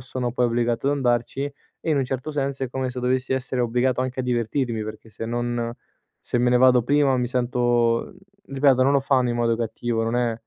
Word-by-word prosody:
sono 125 Hz, -1 st, -4 dB
poi 125 Hz, 0 st, +2 dB
obbligato 120 Hz, +2 st, 0 dB
ad 145 Hz, -, +1 dB
andarci, 120 Hz, +1 st, 0 dB, 0.4 s
e -, -, +1 dB
in 155 Hz, -, +2 dB
un 135 Hz, -, +1 dB
certo 130 Hz, +3 st, -4 dB
senso 140 Hz, -2 st, -2 dB
è 130 Hz, -, -5 dB
come 130 Hz, 0 st, -2 dB
se 125 Hz, 0 st, -5 dB
dovessi 125 Hz, +1 st, 0 dB
essere 130 Hz, -1 st, -1 dB
obbligato 125 Hz, +2 st, +1 dB
anche 130 Hz, 0 st, -4 dB
a -, -, -2 dB
divertirmi 120 Hz, -1 st, -1 dB
perché 110 Hz, +1 st, -9 dB
se 110 Hz, +1 st, -7 dB
non 120 Hz, 0 st, -2 dB, 0.5 s
se -, -, -3 dB
me 125 Hz, 0 st, +2 dB
ne 125 Hz, -, +4 dB
vado 125 Hz, -1 st, +5 dB
prima 140 Hz, +1 st, +3 dB
mi 125 Hz, -1 st, -1 dB
sento 120 Hz, -, +1 dB, 0.3 s
ripeto, 135 Hz, -1 st, +3 dB
non 135 Hz, -, +3 dB
lo 140 Hz, -, +4 dB
fanno 130 Hz, -2 st, +2 dB
in 120 Hz, -, -2 dB
modo 115 Hz, -1 st, +2 dB
cattivo, 115 Hz, 0 st, -2 dB
non 115 Hz, +1 st, -1 dB
è 120 Hz, -1 st, +1 dB
125 Hz, 220 wpm, -23 LUFS, 120-130 Hz, 0.5 s, vado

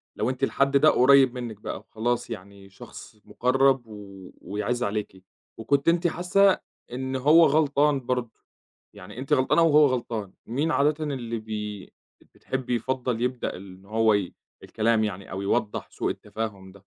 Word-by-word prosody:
لو -, -, -1 dB
أنتِ 130 Hz, +1 st, -5 dB
الحد 140 Hz, +1 st, +2 dB
ده 155 Hz, +3 st, +5 dB
قريّب 130 Hz, 0 st, +5 dB
منِّك 120 Hz, -4 st, -6 dB
بقى -, -, -5 dB
وخلاص 120 Hz, +2 st, -3 dB
يعني 100 Hz, -2 st, -10 dB
شخص 110 Hz, +1 st, -13 dB
مُقرَّب 135 Hz, +1 st, +2 dB
و 100 Hz, -3 st, -11 dB
ويعِز 105 Hz, +5 st, -3 dB
عليكِ، 100 Hz, -4 st, -4 dB, 0.3 s
وكنتِ 140 Hz, +6 st, 0 dB
أنتِ 175 Hz, +1 st, +2 dB
حاسّة 185 Hz, +3 st, +3 dB, 0.3 s
إن 130 Hz, +1 st, -4 dB
هو 150 Hz, +6 st, +6 dB
غلطان 145 Hz, -1 st, +2 dB
برضه، 125 Hz, -2 st, -2 dB, 0.6 s
يعني 90 Hz, -, -12 dB
أنتِ 135 Hz, -, -2 dB
غلطانة 130 Hz, +6 st, +3 dB
وهو 150 Hz, -2 st, +6 dB
غلطان، 115 Hz, -6 st, -3 dB
مين 145 Hz, +8 st, -1 dB
عادةً 150 Hz, +2 st, +1 dB
اللي 120 Hz, -5 st, -4 dB
بي 105 Hz, -2 st, -6 dB
ب -, -, -24 dB, 0.4 s
بتحبّي 130 Hz, -2 st, -3 dB
يفضّل 125 Hz, 0 st, -2 dB
يبدأ 125 Hz, 0 st, -2 dB
ال 95 Hz, 0 st, -11 dB
إن 95 Hz, -, -20 dB
هو 110 Hz, +1 st, +2 dB
ي 100 Hz, -3 st, -1 dB, 0.3 s
الكلام 110 Hz, 0 st, +1 dB
يعني 100 Hz, -2 st, -5 dB
أو 95 Hz, -, -4 dB
يوضّح 105 Hz, +2 st, -2 dB
سوء -, -, -2 dB
التفاهم 100 Hz, -4 st, -6 dB
ده؟ 100 Hz, 0 st, -19 dB
120 Hz, 160 wpm, -25 LUFS, 105-135 Hz, 0.6 s, هو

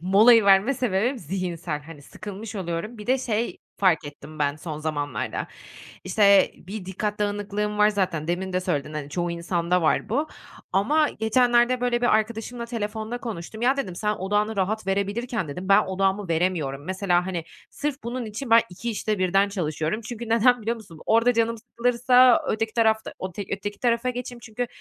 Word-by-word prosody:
molayı 210 Hz, +5 st, +6 dB
verme 200 Hz, +7 st, +5 dB
sebebim 240 Hz, +2 st, 0 dB
zihinsel 170 Hz, -3 st, -4 dB
hani 150 Hz, -1 st, -12 dB
sıkılmış 205 Hz, +6 st, -8 dB
oluyorum. 185 Hz, +5 st, -4 dB
Bir 210 Hz, -, -9 dB
de 260 Hz, +1 st, +3 dB
şey 235 Hz, -2 st, -2 dB, 0.2 s
fark 185 Hz, -6 st, +3 dB
ettim 145 Hz, +2 st, -10 dB
ben 145 Hz, 0 st, 0 dB
son 155 Hz, -2 st, -6 dB
zamanlarda 145 Hz, -6 st, -3 dB, 0.6 s
işte 200 Hz, -1 st, +5 dB
bir 195 Hz, +1 st, -8 dB
dikkat 205 Hz, +3 st, -3 dB
dağınıklığım 205 Hz, 0 st, -2 dB
var 210 Hz, 0 st, +5 dB
zaten 180 Hz, -6 st, -1 dB
demin 185 Hz, +2 st, -2 dB
de 185 Hz, -, +2 dB
söyledin 155 Hz, -4 st, -2 dB
hani 145 Hz, -1 st, -5 dB
çoğu 175 Hz, +2 st, -2 dB
insanda 170 Hz, +1 st, 0 dB
var 160 Hz, +6 st, +1 dB
bu 290 Hz, +7 st, 0 dB, 0.5 s
ama 295 Hz, +11 st, +3 dB
geçenlerde 240 Hz, +2 st, +2 dB
böyle 240 Hz, -1 st, +1 dB
bir 240 Hz, -3 st, +4 dB
arkadaşımla 230 Hz, +2 st, -2 dB
telefonda 220 Hz, 0 st, -4 dB
konuştum. 220 Hz, -2 st, -7 dB
"Ya," 265 Hz, +3 st, +3 dB
dedim, 185 Hz, -10 st, -3 dB
"sen 210 Hz, +2 st, 0 dB
odağını 205 Hz, +3 st, 0 dB
rahat 200 Hz, +2 st, -1 dB
verebilirken," 200 Hz, -, -1 dB
dedim, 180 Hz, +7 st, -6 dB
"ben 195 Hz, -, +7 dB
odağımı 190 Hz, +1 st, 0 dB
veremiyorum." 160 Hz, -5 st, -1 dB
Mesela 185 Hz, -1 st, +1 dB
hani 175 Hz, -3 st, -3 dB, 0.3 s
sırf 290 Hz, -1 st, -4 dB
bunun 240 Hz, +1 st, -4 dB
için 225 Hz, +4 st, -6 dB
ben 230 Hz, 0 st, +7 dB
2 230 Hz, +6 st, -4 dB
işte 215 Hz, -1 st, -2 dB
birden 195 Hz, +2 st, +3 dB
çalışıyorum. 160 Hz, +1 st, -2 dB
Çünkü 235 Hz, 0 st, -7 dB
neden 235 Hz, +1 st, +4 dB
biliyor 230 Hz, +2 st, -1 dB
musun? 170 Hz, -8 st, -13 dB
Orada 230 Hz, +2 st, +4 dB
canım 230 Hz, 0 st, +1 dB
sıkılırsa 245 Hz, +2 st, +4 dB
öteki 220 Hz, 0 st, -1 dB
tarafta 220 Hz, -2 st, +1 dB
ote 185 Hz, +1 st, -5 dB
öteki 205 Hz, +1 st, -4 dB
tarafa 240 Hz, +1 st, +1 dB
geçeyim 245 Hz, -1 st, -5 dB
çünkü 235 Hz, +2 st, -4 dB
205 Hz, 170 wpm, -25 LUFS, 180-235 Hz, 0.6 s, ben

